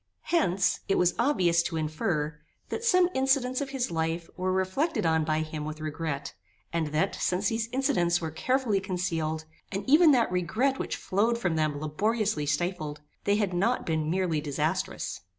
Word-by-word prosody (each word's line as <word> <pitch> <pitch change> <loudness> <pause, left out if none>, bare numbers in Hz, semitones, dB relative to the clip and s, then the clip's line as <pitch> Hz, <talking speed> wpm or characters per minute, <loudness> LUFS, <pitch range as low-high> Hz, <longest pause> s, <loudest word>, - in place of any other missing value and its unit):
Hence, 190 - +2
it 195 - +3
was 180 0 +3
obvious 180 - +3
to 165 -1 -3
infer, 155 -1 -1 0.3
that 450 - -4
some 365 -6 +5
incidents 265 -1 +2
of 280 - -3
his 265 -7 -2
life 165 +1 -2
were 185 0 -1
reflected 205 - 0
on 160 -1 +3
by 155 0 0
him 155 -1 -4
with 155 +1 -5
regret; 150 -2 -4 0.4
and 165 -2 0
that, 155 +6 0
since 185 +3 0
these 225 0 -2
incidents 240 -11 +2
were 160 -2 -4
carefully 240 +3 +1
concealed, 165 -4 -2 0.3
and 195 +3 -4
even 310 +4 +7
that 245 -8 +4
regret 220 +10 0
which - - -2
flowed 225 +5 +1
from 180 -8 0
them 155 -2 0
laboriously 195 +2 0
stifled, 150 -1 -2 0.2
they 200 - +3
had 205 -3 0
not 215 +8 +1
been 155 -2 0
merely 175 -3 0
disastrous. 145 -2 -2
180 Hz, 170 wpm, -28 LUFS, 155-230 Hz, 0.4 s, even